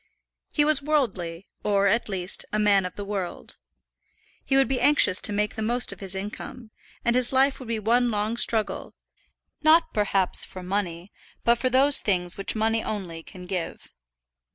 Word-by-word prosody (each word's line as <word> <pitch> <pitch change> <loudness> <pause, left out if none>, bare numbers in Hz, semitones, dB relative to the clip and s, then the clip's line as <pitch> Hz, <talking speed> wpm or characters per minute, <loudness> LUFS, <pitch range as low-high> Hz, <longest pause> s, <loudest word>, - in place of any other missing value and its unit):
He 295 - +2
was 300 -2 +4
worldly, 200 - -2 0.2
or, 200 -1 +1
at 215 +3 +1
least, 185 -1 0
a 215 - -1
man 200 -3 +2
of 180 - -13
the 205 - -6
world. 195 -3 -5 0.9
He 270 - +1
would 270 - +4
be 265 -1 -2
anxious 285 -10 +5
to - - +3
make 210 +1 -1
the 220 - -6
most 240 +3 +1
of - - -10
his 195 -1 -3
income, 215 +4 -8 0.3
and 235 0 +2
his 250 -1 +5
life 270 +1 +2
would 255 - -10
be 230 -1 -2
one 240 +3 +1
long 215 +1 -2
struggle, 225 -2 +1 0.7
not 320 +2 +3
perhaps 195 -3 +1
for 185 - -10
money, 180 -1 -4 0.3
but 235 0 +2
for 255 - 0
those 270 +3 +4
things 180 -3 -1
which 195 - -1
money 225 +1 0
only 180 -6 -6
can 180 +2 -12
give. 180 -2 -6
210 Hz, 175 wpm, -24 LUFS, 190-245 Hz, 0.9 s, anxious